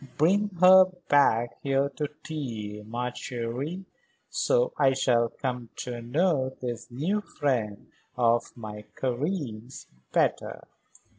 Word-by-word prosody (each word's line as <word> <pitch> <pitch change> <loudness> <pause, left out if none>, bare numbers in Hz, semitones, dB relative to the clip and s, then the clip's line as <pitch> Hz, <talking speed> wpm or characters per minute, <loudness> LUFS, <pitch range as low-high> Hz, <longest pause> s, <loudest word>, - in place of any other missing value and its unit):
"Bring 195 +7 +3
her 185 +1 +9 0.2
back 120 -5 +3
here 135 0 +1
to 145 +1 -3 0.2
tea, 110 -9 -5
ma 120 +3 -3
chérie. 130 +11 -4 0.5
So - - +2
I 135 -2 +4
shall 120 -3 +2
come 125 -3 -4
to 120 -1 -5
know 130 +1 +1
this 120 -2 -5
new 165 +12 -1
friend 120 - -2 0.3
of 120 -1 +2
my 105 -2 -8
Karen's 130 - -3 0.3
better." - - 0
130 Hz, 115 wpm, -27 LUFS, 120-150 Hz, 0.5 s, her